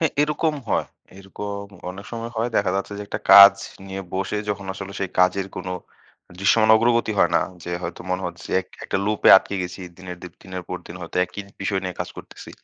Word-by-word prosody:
হ্যাঁ, 160 -3 +1
এরকম 150 +1 0
হয়। - - +1 0.3
এরকম 100 +1 -6 0.3
অনেক 95 +2 -10
সময় 115 0 -5
হয়। 115 +2 0
দেখা 100 -2 +2
যাচ্ছে 100 +1 -3
যে - - -4
একটা - - -4
কাজ 100 0 +11 0.3
নিয়ে 95 0 -5
বসে 95 +2 -2
যখন 100 -1 -3
আসলে 95 0 -7
সেই 95 -2 -2
কাজের 90 +1 +3
কোনো 90 0 -4 0.7
দৃশ্যমান 110 +3 +4
অগ্রগতি 115 -1 +2
হয় 85 - +4
না - - +3 0.2
যে - - -5
হয়তো - - -5
মনে 90 +1 -1
হচ্ছে 85 0 -8
এক 90 - -13 0.2
একটা - - -1
লুপে 105 0 +2
আটকে 100 - 0
গেছি 90 +2 -6 0.2
দিনের 95 -1 -8
দি - - -6 0.2
দিনের 95 -1 -6
পর 90 - -3
দিন 85 - -9
হয়তো 90 - -7
একই 95 +3 -8 0.2
বিষয় 95 -1 0
নিয়ে 90 -1 -4
কাজ - - -3
করতেছি। - - -11
100 Hz, 205 wpm, -23 LUFS, 90-105 Hz, 0.7 s, কাজ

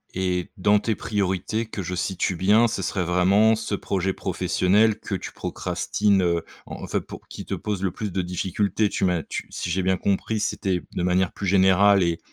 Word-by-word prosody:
Et 90 -1 -1
dans 105 +3 +4
tes 110 +2 0
priorités, 100 +2 -1
que 105 -2 -6
je 90 +1 -4
situe 95 0 -1
bien, 105 +6 +4
ce 105 -4 -3
serait 95 0 -1
vraiment 95 +6 +4
ce 110 -1 -5
projet 95 -1 -1
professionnel 95 +4 +1
que 100 - -4
tu - - -6
procrastines, 100 -2 0
heu, 85 -2 0 0.2
enfin, - - -3
pou - - -10
qui - - -7
te - - -3
pose 105 -3 -3
le 95 - +1
plus 105 -3 -5
de 95 - -1
difficultés, 95 +3 -1
tu - - -1
m'as 90 -4 +1
tu - - -6
si 85 - -4
j'ai 95 +2 0
bien 95 0 +1
compris, 100 +3 -1
c'était 95 -3 -1
de - - -2
manière 90 0 +2
plus 100 - -5
générale 95 +1 +5
et 85 -1 0
95 Hz, 195 wpm, -24 LUFS, 90-105 Hz, 0.2 s, générale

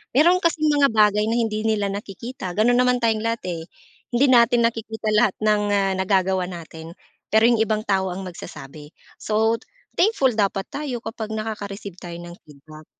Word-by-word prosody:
Meron 345 +6 +5
kasing 315 -3 +1
mga 285 -1 +4
bagay 210 -1 +4
na 225 - 0
hindi 220 -2 -1
nila 205 -2 0
nakikita 200 +1 -6
gano'n 240 +3 +3
naman 250 0 +2
tayong 220 -1 +1
lahat, 230 0 -2
eh. 165 -2 -4 0.5
Hindi 245 +4 +4
natin 240 -1 +5
nakikita 225 -1 -2
lahat 210 -2 +3
ng, 210 -1 +2
ah, 195 -1 +2
nagagawa 190 -1 +1
na'tin, 165 -1 -9 0.3
pero 220 +1 +3
'yong 235 -2 +2
ibang 215 0 -1
tao 190 -3 0
ang 190 +2 -6
magsasabi. 150 -4 -10 0.3
So, 220 +2 +1 0.4
thankful 355 - +3
dapat 200 -2 0
tayo 280 -4 -4
kapag 220 -1 -6
nakaka-receive 205 -3 -6
tayo 170 -2 -8
ng 175 0 -10
feedback. 155 +1 -15
215 Hz, 165 wpm, -22 LUFS, 190-235 Hz, 0.5 s, Meron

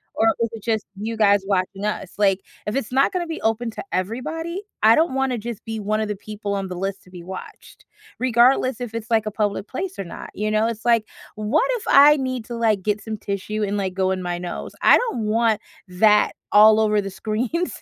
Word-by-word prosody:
Or 225 - +3
is 230 - +1
it 225 -1 -8
just 220 -3 -1
you 220 +3 -4
guys 205 -2 +4
watching 195 +1 -1
us?" 210 -3 -3
Like, 195 -2 +2 0.2
if 210 - -3
it's 270 -4 -2
not 270 +2 +3
gonna 355 -2 -2
be 325 - -5
open 225 +2 0
to - - -7
everybody, 320 - -3 0.2
I 220 +1 +7
don't 320 -3 +2
wanna 265 -2 0
just 230 0 -6
be 225 -1 -5
one 215 +1 -1
of 215 - -1
the 210 - -2
people 205 0 -6
on 195 -1 -3
the 180 - -6
list 195 +1 -4
to - - -19
be 175 -2 -10
watched, 185 +1 -10 0.3
regardless 255 0 +3
if 240 -3 -5
it's, 225 -1 -5
like, 220 -1 +3
a - - -2
public 205 -1 -2
place 365 +7 -5
or - - -1
not, 170 - -9
you 210 +1 -2
know? 215 +1 +2
It's, 225 -1 -5
like, 230 -2 +3 0.3
what 215 +8 +1
if 445 - -9
I 290 +2 +7
need 255 -4 -3
to, 240 - -6
like, 220 -4 +1
get 205 +1 -1
some 220 0 -5
tissue 205 +2 -3
and, 205 0 -1
like, 190 -2 -2
go 190 0 0
in 190 -1 -2
my 175 0 -2
nose? 175 -1 -6
I - - +7
don't 465 - -2
want 220 0 +2 0.3
that 210 +4 +3 0.2
all 215 +1 +7
over 215 -1 +2
the 195 -1 -3
screens, 230 - -2
215 Hz, 230 wpm, -22 LUFS, 200-240 Hz, 0.3 s, I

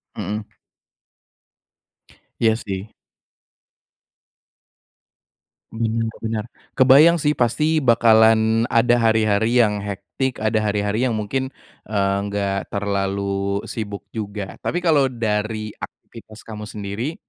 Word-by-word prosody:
Mhm. 105 +1 -4 1.9
Iya 110 -1 +4
sih. 100 -1 -6 2.8
Benar 115 0 -1
benar. 110 -1 -3 0.3
Kebayang 140 +6 +7
sih, 150 -2 +1
pasti, 150 +5 +1
bakalan 115 -2 +4
ada 120 +1 +3
hari-hari 110 0 +2
yang 105 -2 0
hectic 100 +6 -4
ada 110 0 0
hari-hari, 105 +3 0
yang 115 - -1
mungkin, 120 +5 -2 0.4
eee, 100 -2 0
enggak 100 -1 -2
terlalu 100 0 -2
sibuk 100 -3 -6
juga. 105 -3 -6
Tapi, 175 +1 -2
kalau 150 -5 +4
dari 110 -3 -2
aktivitas 110 -1 -11
kamu 105 -1 -8
sendiri, 105 +11 -5
110 Hz, 95 wpm, -21 LUFS, 100-120 Hz, 2.8 s, Kebayang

